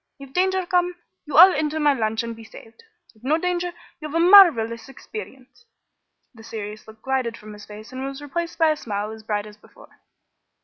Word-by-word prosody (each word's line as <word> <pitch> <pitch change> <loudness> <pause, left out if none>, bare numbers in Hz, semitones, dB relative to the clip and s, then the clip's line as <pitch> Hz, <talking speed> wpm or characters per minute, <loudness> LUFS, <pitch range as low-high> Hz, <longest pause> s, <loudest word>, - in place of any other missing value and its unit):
If 275 -1 -13
danger 375 0 +1
come, 355 0 0 0.3
you 295 - -2
all 365 +3 +9
enter 305 +1 -1
my 295 -1 +3
launch 220 -3 -1
and 230 0 -6
be 225 - -13
saved. 225 - -15 0.3
If 220 0 -27
no 295 +5 +2
danger, 355 +1 -2 0.3
you 305 - -6
have 305 - -7
a - - +2
marvelous 290 - +6
experience." 265 - -11 0.7
The 225 - -15
serious 215 -1 -8
look 220 0 -16
glided 260 -4 -2
from 210 0 -12
his 210 -1 -12
face, 215 +3 -11
and 260 +1 -6
was 275 0 -6
replaced 335 +4 -5
by 320 -2 +4
a 305 - -2
smile 210 -4 -4
as 220 0 -10
bright 210 -1 -3
as 210 0 -13
before. - - -20
265 Hz, 205 wpm, -23 LUFS, 220-330 Hz, 0.7 s, all